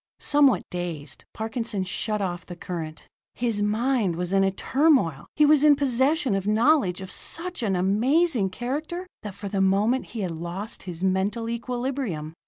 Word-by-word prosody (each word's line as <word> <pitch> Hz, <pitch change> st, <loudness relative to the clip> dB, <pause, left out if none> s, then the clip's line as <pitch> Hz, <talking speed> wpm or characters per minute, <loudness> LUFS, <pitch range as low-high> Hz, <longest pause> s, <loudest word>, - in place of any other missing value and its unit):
Somewhat 290 Hz, -3 st, +4 dB
dazed, 165 Hz, -6 st, -5 dB
Parkinson 220 Hz, -2 st, -3 dB
shut 210 Hz, +3 st, -2 dB
off 175 Hz, -1 st, -3 dB
the 175 Hz, -, -9 dB
current. 165 Hz, -3 st, -6 dB, 0.3 s
His 230 Hz, -4 st, -1 dB
mind 215 Hz, -2 st, +1 dB
was 180 Hz, +2 st, -3 dB
in 195 Hz, 0 st, +4 dB
a 195 Hz, -, +3 dB
turmoil. 245 Hz, -, +2 dB
He 300 Hz, -, +5 dB
was 300 Hz, -1 st, +5 dB
in 300 Hz, -1 st, +7 dB
possession 275 Hz, 0 st, +1 dB
of 195 Hz, 0 st, -1 dB
knowledge 215 Hz, -, +3 dB
of 190 Hz, -, -6 dB
such 355 Hz, -2 st, -1 dB
an 200 Hz, -5 st, 0 dB
amazing 225 Hz, -, +2 dB
character 295 Hz, -, -4 dB, 0.2 s
that, 205 Hz, -3 st, -7 dB
for 200 Hz, 0 st, -6 dB
the 195 Hz, 0 st, -1 dB
moment 205 Hz, +7 st, +2 dB
he -, -, -2 dB
had 185 Hz, -3 st, -2 dB
lost 175 Hz, +6 st, -5 dB
his 175 Hz, +1 st, -6 dB
mental 195 Hz, +5 st, 0 dB
equilibrium. 240 Hz, -, -3 dB
210 Hz, 165 wpm, -25 LUFS, 185-265 Hz, 0.3 s, in